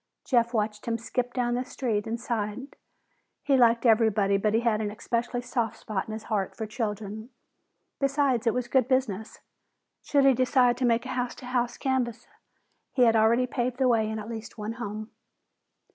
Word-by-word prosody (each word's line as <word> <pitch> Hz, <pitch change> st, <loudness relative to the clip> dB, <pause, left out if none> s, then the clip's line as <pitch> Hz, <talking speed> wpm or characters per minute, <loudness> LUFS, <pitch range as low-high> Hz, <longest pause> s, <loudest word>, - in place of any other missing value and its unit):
Jeff 235 Hz, -2 st, +2 dB
watched 215 Hz, -2 st, -2 dB
him 230 Hz, -1 st, 0 dB
skip 245 Hz, +2 st, -2 dB
down 245 Hz, -1 st, 0 dB
the 250 Hz, +1 st, 0 dB
street 230 Hz, -5 st, -2 dB
and 230 Hz, +1 st, -3 dB
sighed. 235 Hz, +2 st, -4 dB, 0.7 s
He 280 Hz, -, +3 dB
liked 235 Hz, -1 st, +4 dB
everybody, 220 Hz, -3 st, +4 dB
but 210 Hz, +2 st, +1 dB
he 225 Hz, -, +3 dB
had 225 Hz, -2 st, +1 dB
an 210 Hz, -, -1 dB
especially 240 Hz, +3 st, -2 dB
soft 235 Hz, -3 st, -2 dB
spot 205 Hz, -3 st, -4 dB
in 215 Hz, -, -5 dB
his 220 Hz, 0 st, -6 dB
heart 205 Hz, -4 st, -2 dB
for 220 Hz, -, -3 dB
children. 215 Hz, 0 st, -4 dB, 0.7 s
Besides, 275 Hz, -4 st, +1 dB
it 230 Hz, -, +4 dB
was 250 Hz, -1 st, -1 dB
good 255 Hz, -1 st, +2 dB
business. 235 Hz, -6 st, -1 dB, 0.6 s
Should 280 Hz, -2 st, +2 dB
he 270 Hz, -, +7 dB
decide 250 Hz, -1 st, +3 dB
to 255 Hz, -, 0 dB
make 235 Hz, +1 st, +2 dB
a -, -, -6 dB
house 250 Hz, -1 st, -2 dB
to -, -, -11 dB
house 245 Hz, -1 st, -1 dB
canvass, 245 Hz, -3 st, -1 dB, 0.7 s
he 255 Hz, -, +3 dB
had 230 Hz, -1 st, +5 dB
already 225 Hz, +3 st, +4 dB
paved 245 Hz, 0 st, -2 dB
the 260 Hz, -1 st, +2 dB
way 225 Hz, -3 st, +2 dB
in 220 Hz, -, -3 dB
at 215 Hz, 0 st, -6 dB
least 225 Hz, -1 st, -7 dB
one 215 Hz, +1 st, -4 dB
home. 215 Hz, -2 st, -6 dB
235 Hz, 190 wpm, -27 LUFS, 220-250 Hz, 0.7 s, he